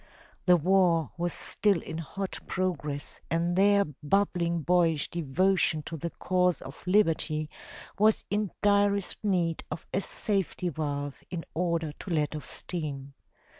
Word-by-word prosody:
The 180 -1 +7
war 170 -3 +3
was 175 0 -1
still 200 +1 +1
in 160 - -6
hot 195 +4 -4
progress 150 -6 -2
and 170 +1 +1
their 200 +1 +5
bubbling 170 +2 0
boyish 165 -3 +2
devotion 170 0 +1
to 165 - -6
the 165 +2 -3
cause 180 0 +1
of 135 +3 -10
liberty 160 -5 +2 0.5
was 215 +1 +4
in 205 -1 +1
direst 200 -1 +2
need 175 -5 +1
of 155 +1 -6
a 190 - +1
safety 195 -3 -1
valve 145 -3 -4
in 175 -2 -5
order 170 -2 0
to 165 - -10
let 155 -3 0
off 150 - -6
steam. 140 -5 -5
170 Hz, 135 wpm, -29 LUFS, 155-190 Hz, 0.5 s, The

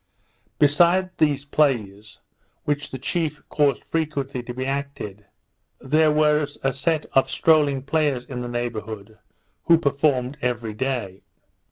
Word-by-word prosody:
Besides 175 +6 +4
these 145 -3 +2
plays, 110 -9 0 0.5
which 145 0 -2
the 130 - -6
chief 150 +3 -3
caused 145 -2 +1
frequently 145 -5 -2
to 120 - -7
be 130 +2 -4
acted, 135 -7 -4 0.5
there 155 +3 +3
was 150 -1 +2
a 135 0 +1
set 155 +3 0
of 135 0 +3
strolling 145 -3 +3
players 140 -4 0
in 125 -2 -6
the 120 - -4
neighbourhood, 110 -3 -5 0.5
who 170 - +6
performed 140 -2 0
everyday. 120 -3 -2
140 Hz, 125 wpm, -23 LUFS, 120-150 Hz, 0.5 s, who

